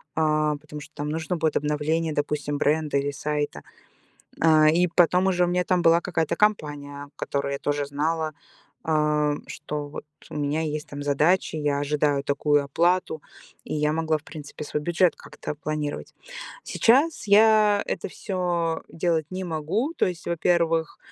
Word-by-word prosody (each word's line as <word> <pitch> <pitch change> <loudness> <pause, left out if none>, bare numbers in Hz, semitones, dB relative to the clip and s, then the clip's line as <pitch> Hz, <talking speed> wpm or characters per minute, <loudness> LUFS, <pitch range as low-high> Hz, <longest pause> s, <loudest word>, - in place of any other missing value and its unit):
а, 155 -1 +1
потому 150 0 -10
что - - -13
там 145 +1 -4
нужно 160 +2 -2
будет 160 -1 +1
обновление, 150 +2 0
допустим, 145 0 -2
бренда 150 -1 +1
или 140 +1 0
сайта. 145 - -3 0.8
А, 155 -1 +6
и 175 +3 +3
потом 180 +2 +3
уже 180 -1 +2
у - - -2
меня 180 +1 +1
там 180 -1 +1
была 165 +1 +5
какая-то 160 -3 -1
компания, 145 -8 -1
которую 140 0 -2
я 140 - -3
тоже 145 0 -1
знала, 155 +2 -1 0.6
а, 150 -1 +2
что 150 -1 -5
вот 150 - -8 0.3
у - - -6
меня 150 +2 -1
есть 150 -1 -4
там 145 0 -6
задачи, 155 +5 +2
я 145 -2 0
ожидаю 145 -1 +1
такую 145 +1 +2
оплату, 170 +2 +1 0.4
и - - -4
я 150 0 +1
могла, 160 -1 0
в 145 - -24
принципе, 150 -1 -9
свой 150 - -3
бюджет 175 +2 +2
как-то - - -7
планировать. 150 0 -4 0.5
Сейчас 275 +3 +2
я 210 0 +5
это - - -3
всё 175 -4 -2
делать 165 -2 0
не 185 +1 -4
могу. 180 - -2
То - - +2
есть, 180 -2 -5
во-первых, 165 -1 +1
155 Hz, 160 wpm, -25 LUFS, 145-175 Hz, 0.8 s, А